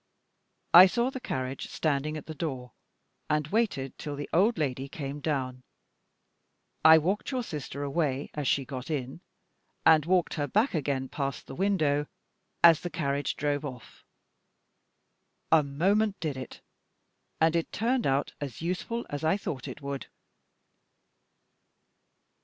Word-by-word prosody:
I 180 +2 +11
saw 235 +6 0
the 260 - -5
carriage 130 - -4
standing 155 0 -1
at 150 - -8
the 160 - -6
door, 135 -6 -4 0.6
and 150 -1 +1
waited 195 - -1
till 145 -1 -5
the 145 0 -5
old 210 +7 +3
lady 135 -2 -2
came 140 0 -5
down. 130 -4 -2 1.2
I 160 0 +9
walked 185 +6 0
your 255 -3 -1
sister 145 - -5
away 140 -2 -1
as 145 -3 -3
she 135 0 +1
got 130 0 -7
in, 135 0 -4 0.6
and 160 -1 +6
walked 180 -1 +2
her 145 -2 -1
back 220 - +2
again 140 -4 -1
past 140 0 -4
the - - -9
window 155 -5 +1 0.6
as 165 -2 +8
the 175 - -5
carriage 145 -4 -1
drove 145 0 -1
off. 130 -4 -9 1.5
A 160 -1 +7
moment 195 +9 +1
did 155 -4 -2
it, 130 0 -8 0.8
and 160 +1 +3
it 165 - -1
turned 240 +3 0
out 135 +1 0
as 140 -5 -5
useful 185 +8 -3
as 145 +1 -4
I 160 +5 +3
thought 145 -10 -5
it 145 - -8
would. 140 -1 -4
150 Hz, 140 wpm, -28 LUFS, 140-175 Hz, 1.5 s, I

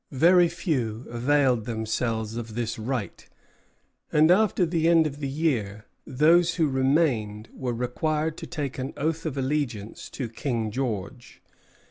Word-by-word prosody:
Very 175 +4 +6
few 130 - -2
availed 125 -1 +2
themselves 110 -1 -2
of 115 -2 -6
this 115 -1 -3
right; 120 -1 -4 0.9
and 155 +2 +5
after 200 -1 +3
the 165 -1 0
end 165 -1 +5
of 145 -1 -4
the 140 - -3
year 120 -9 -1 0.2
those 165 +6 +4
who 160 -3 +2
remained 130 -6 +1
were 125 -2 -3
required 150 +6 -1
to - - -7
take 145 -6 -4
an 130 +2 -4
oath 160 +2 -1
of 140 -3 -4
allegiance 130 -6 -3
to 130 - -4
King 115 -2 -3
George. 120 0 -5
130 Hz, 140 wpm, -26 LUFS, 115-155 Hz, 0.9 s, Very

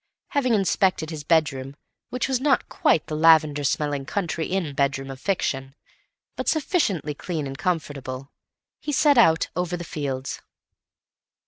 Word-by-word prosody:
Having 255 -5 +2
inspected 185 -4 +1
his 155 -2 -6
bedroom 140 -4 +1 0.3
which 250 0 -2
was 260 -2 0
not 270 -2 +2
quite 160 - +2
the 155 - -4
lavender 155 -2 +5
smelling 145 0 0
country 175 -5 -2
inn 180 -6 -2
bedroom 135 -1 -1
of 130 - -9
fiction, 135 -7 -2 0.6
but - - -4
sufficiently 230 - +1
clean 155 0 -4
and 135 0 -5
comfortable, 140 -5 -3 0.5
he 295 - -4
set 290 -2 +4
out 165 -7 +4
over 180 0 -1
the 175 - -6
fields. 140 -5 -4
160 Hz, 140 wpm, -24 LUFS, 140-195 Hz, 0.6 s, lavender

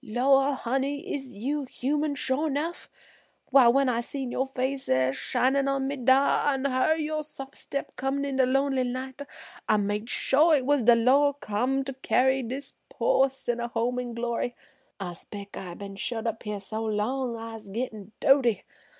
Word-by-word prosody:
"Lor', 270 +4 +3
honey, 270 +4 -2
is 270 -3 -5
you 280 +8 -2
human 290 +3 -1
sho' 265 +3 0
nuff? 310 +4 -3 0.6
Why 265 -2 +7
when 270 +3 +4
I 240 -2 +1
seen 255 +1 -4
yo' 265 - 0
face 265 +1 -3
er'shinin' 135 - +1
on 275 -1 0
me 280 - -2
dar, 270 +2 +3
an' 265 +1 -3
hearn 280 +4 +2
yer 310 0 -2
sof' 280 -3 -8
step 280 - -5
comin' 270 +1 -1
en 275 -1 -2
de 260 -1 +4
lonely 270 0 +2
night, 255 +2 -5 0.5
I 215 - +5
made 205 +2 -2
sho' 305 +7 +3
it 270 -4 +2
was 290 0 +3
de 240 +1 +6
Lor' 275 +5 +4
come 265 +2 -1
to 270 0 -5
carry 265 0 +2
dis' 260 +3 -3 0.2
po' 380 - +3
sinner 260 -3 -4
to 235 - -2
er 240 - -7
home 245 +2 0
in 245 -2 -5
glory. 235 +1 -2 0.4
I 180 -3 -4
'spec' 200 +3 -10
I 180 -2 -7
been 200 0 -8
shut 225 +2 -3
up 225 -1 -2
her 210 -1 -3
so 215 +3 -5
long 230 +4 -1
I'se 225 -2 -8
gittin' 215 -2 -5
doaty. 265 -5 +4
260 Hz, 180 wpm, -27 LUFS, 230-275 Hz, 0.6 s, Why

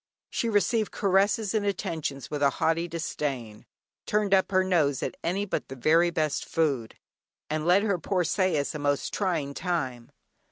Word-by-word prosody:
She 230 - -1
received 210 +1 +1
caresses 200 +2 +2
and 215 -2 +1
attentions 155 -9 -3
with 145 -1 -3
a 140 - +5
haughty 165 +4 0
disdain, 140 -9 -4 0.4
turned 210 -1 +1
up 190 -1 +4
her 185 -1 +4
nose 155 -8 +1
at - - -3
any 195 +4 0
but 200 - -3
the 135 - -7
very 165 +6 +4
best 155 -3 -1
food, 140 -8 -1 0.6
and 155 +1 -1
led 185 +3 +5
her 200 -4 +1
poor 185 +1 0
sais 170 -4 0
a 150 - -5
most 145 -1 -1
trying 165 -8 -1
time. 135 -9 -3
165 Hz, 165 wpm, -27 LUFS, 145-195 Hz, 0.6 s, a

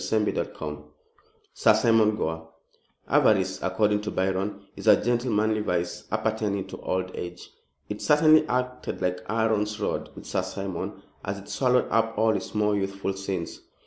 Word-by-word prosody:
CHAPTER - - +1 0.3
II - - -4 0.8
SIR 110 - +5
SIMON 110 -1 +4
GORE 80 -4 -3 0.6
Avarice, 95 -3 +3
according 105 -1 +1
to 105 - -4
Byron, 95 +1 -1
is - - -8
a - - +7
gentlemanly 110 -3 +1
vice 90 -4 -2
appertaining 105 -3 -1
to - - -8
old 95 0 -2
age. 90 0 -7 0.4
It 105 0 -5
certainly 155 +1 +5
acted 125 0 -2
like 90 0 -1
Aaron's 105 -1 0
rod - - -2
with - - -10
Sir - - -1
Simon, 95 -3 -5 0.2
as 100 0 -3
it 100 - -12
swallowed 125 -1 +2
up 115 0 +1
all 110 +1 +3
his 100 0 -4
more 105 -1 +2
youthful 95 0 -2
sins. 95 -3 -4
105 Hz, 150 wpm, -26 LUFS, 95-110 Hz, 0.8 s, a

